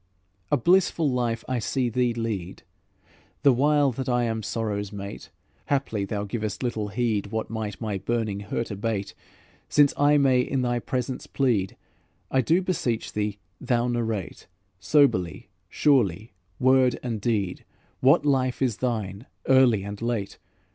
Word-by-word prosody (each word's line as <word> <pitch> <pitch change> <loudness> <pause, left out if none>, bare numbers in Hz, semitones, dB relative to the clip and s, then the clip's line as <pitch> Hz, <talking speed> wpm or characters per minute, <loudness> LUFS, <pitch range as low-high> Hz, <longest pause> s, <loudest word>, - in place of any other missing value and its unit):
"A 145 - +4
blissful 170 0 +3
life 120 -2 -1
I 130 -1 -1
see 125 +2 -1
thee 120 +1 +1
lead, 110 -6 -4 0.8
The 140 - +6
while 145 +2 +3
that 130 +1 -4
I 120 -1 +2
am 115 -1 -1
sorrow's 105 -2 -3
mate; 100 -1 -8 0.4
Haply 130 -8 0
thou 100 +1 -3
givest 105 +2 -4
little 110 -4 -2
heed 105 -1 -1
What 110 +2 -4
might 110 -3 -4
my 105 -4 -3
burning 110 -1 -2
hurt 105 +3 -4
abate. 100 -1 -3 0.6
Since 145 -1 +4
I 145 +1 +4
may 130 -3 +4
in 130 +1 -1
thy 120 -1 0
presence 125 +1 -3
plead, 115 -9 0 0.5
I 130 - +3
do 165 +9 +2
beseech 130 -11 -2
thee 105 -1 -2 0.2
thou 120 -1 0
narrate, 115 -6 -3 0.3
Soberly, 100 - +2 0.2
surely, 110 - +2 0.3
word 130 0 +4
and 115 -4 -3
deed, 100 -5 -1 0.4
What 135 +3 +4
life 130 -3 +1
is 125 -6 0
thine, 110 -3 -3 0.2
early 130 -6 +5
and 100 +1 -7
late? 115 -4 -3
115 Hz, 145 wpm, -25 LUFS, 105-130 Hz, 0.8 s, The